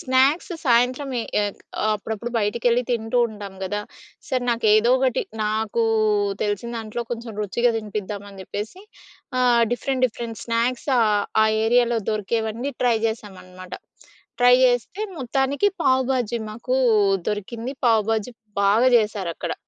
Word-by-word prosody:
Snacks 265 +7 +2
సాయంత్రం 250 +2 +2
ఎ - - -2 0.2
ఏక్ 205 -1 -4 0.3
అప్పుడప్పుడు 220 +2 -4
బయటికెళ్ళి 235 +3 +1
తింటూ 230 0 0
ఉంటాం 205 -3 -9
గదా! 205 +2 -2 0.5
సరే, 255 -3 -1
నాకేదో 220 0 +3
ఒకటి, 260 -2 +1 0.2
నాకు 215 +2 0 0.6
తెలిసిన 210 +3 -2
దాంట్లో 225 +1 -4
కొంచెం 235 -1 -5
రుచిగా 235 +5 +1
తినిపిద్దామని 205 -2 -6
చెప్పేసి 210 - -6 0.6
ఆహ్, 245 -2 +4
డిఫరెంట్, 255 +1 0
డిఫరెంట్ 230 -1 -7
స్నాక్స్ 235 +1 -1
ఆహ్, 210 -3 +3 0.2
ఆ - - +5 0.2
ఏరియాలో 240 0 +3
దొరికేవన్నీ 220 +5 -2
ట్రై 240 -2 +3
జేసామనమాట. 185 -4 -8 0.7
ట్రై 245 0 +7
జేస్తే 250 - +1 0.2
మొత్తానికి 270 +7 +1
పావు 260 0 +3
బాజీ 240 -2 -1
మాకు 240 +4 -2 0.5
దొరికింది. 225 +5 -4
పావు 225 -2 +4
బాజీ 225 +2 -1 0.3
బాగా 215 +6 +4
జేసారక్కడ. 205 -6 -1
230 Hz, 120 wpm, -23 LUFS, 210-245 Hz, 0.7 s, ట్రై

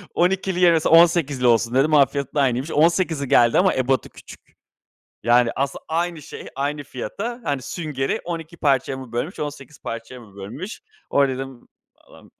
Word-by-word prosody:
“12'li 185 +1 +1
yerine 170 -2 +5
18'li 160 -6 +4
olsun“ 115 +1 +2
dedim. 145 +4 +3
Onun 145 -2 +7
fiyatı 140 0 -5
da 145 - +2
aynıymış, 130 +3 0
18'li 165 -2 +2
geldi 120 -3 +4
ama 185 +1 +3
ebadı 130 0 0
küçük. - - -14 0.8
Yani, 120 +1 +4
aslında, 140 0 -2
aynı 170 0 -2
şey, - - -10
aynı 145 +2 -2
fiyata, 195 - -6
hani, 140 -3 -2
süngeri 145 -3 -3
12 165 -1 -6
parçaya 135 -3 +1
mı 130 -3 -10
bölmüş, 140 +10 -3
18 145 -1 -7
parçaya 115 +2 -7
mı 105 -4 -17
bölmüş? 120 - -7 0.3
Orada 140 -2 +2
dedim, 130 -1 -8 0.3
“Allahım - - -19
140 Hz, 160 wpm, -22 LUFS, 130-165 Hz, 0.8 s, Onun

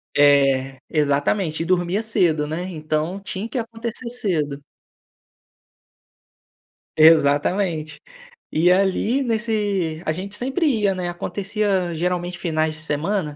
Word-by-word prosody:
É, 135 -2 +4
exatamente. 155 +3 0
E - - -5
dormia 180 +3 0
cedo, 175 -9 +2
né. 165 +5 -4
Então, 155 +2 -2
tinha 200 +2 -5
que 245 - -4
acontecer 230 +1 -5
cedo. 155 -12 -2 2.3
Exatamente. 155 +1 +3 0.5
E 170 +3 +3
ali 195 +8 +2
nesse 210 -8 -1
a - - +1
gente 190 +5 -5
sempre 270 - 0
ia, 210 -8 +2
né, 180 -2 -3
acontecia 195 0 -1
geralmente 175 +1 -2
finais 160 -2 -1
de 155 - -5
semana 155 +1 -2
175 Hz, 110 wpm, -22 LUFS, 155-205 Hz, 2.3 s, É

